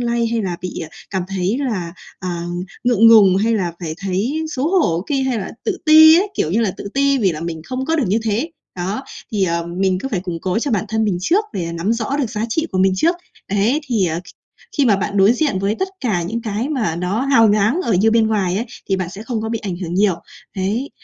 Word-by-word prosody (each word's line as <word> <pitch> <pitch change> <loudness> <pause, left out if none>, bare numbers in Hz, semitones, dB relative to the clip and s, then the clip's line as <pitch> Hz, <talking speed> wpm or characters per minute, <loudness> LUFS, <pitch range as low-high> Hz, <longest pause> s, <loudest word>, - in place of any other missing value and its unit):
lay 235 -1 0
hay 230 -1 -1
là 180 -3 -3
bị, 180 0 -5
à, 160 - -6 0.2
cảm 190 -2 -1
thấy 195 +5 -1
là, 175 -5 -3 0.3
à, 175 -2 -3 0.4
ngượng 230 -2 +5
ngùng 200 -5 +7
hay 225 +3 +2
là 180 -5 -1
phải 160 -2 -4
thấy 200 +11 -1
xấu 285 +1 -1
hổ 170 - 0
ki 275 -2 +1
hay 260 -3 0
là 190 - -5
tự 410 -4 -1
ti 315 +1 +9
ấy, 405 - 0
kiểu 155 - 0
như 220 +6 +2
là, 215 -4 +1
tự - - -6
ti 275 0 +3
vì 190 -6 +2
là 155 - -6
mình 165 -1 -5
không 255 +6 -3
có 325 +2 0
được 290 - +1
như 205 +5 +2
thế. 225 +9 -1 0.3
Đó, 190 +7 -3 0.3
thì, 200 -3 +2
ờ, 170 -1 -1
mình 185 +2 0
cứ 270 - -3
phải 195 -7 -2
củng 175 -3 -5
cố 185 +4 0
cho 275 +3 -2
bản 210 -2 0
thân 220 0 0
mình 190 -5 0
trước 380 - +2
để, 180 - -3
à, 170 - -5
nắm 170 +6 -1
rõ 235 +4 -2
được 260 -7 -1
giá 215 -1 -2
trị 320 +8 -1
của 185 - 0
mình 190 0 +4
trước, 340 - +2 0.3
đấy, 215 +9 +2
thì, 220 -7 +1
ờ, 165 +1 -2
kh - - -13 0.5
khi 285 - +3
mà 210 -5 +4
bạn 200 +1 -3
đối 200 +3 +6
diện 250 -8 0
với 200 +2 0
tất 380 - -1
cả 205 -10 0
những 225 +7 -3
cái 220 +5 -2
mà 220 - -1
nó 180 +6 -1
hào 260 -5 +4
nhoáng 215 - +2
ở 230 - 0
như 205 +4 +3
bên 225 -1 +3
ngoài 195 -4 0
ấy, 230 - -2 0.2
thì 195 - +2
bạn 185 -2 -3
sẽ 200 +4 -8
không 225 -1 -3
có 220 - -3
bị 225 0 -2
ảnh 190 -4 -4
hưởng 175 -1 -5
nhiều, 195 -1 +3 0.4
đấy. 210 +9 -1
210 Hz, 260 wpm, -19 LUFS, 185-245 Hz, 0.5 s, ti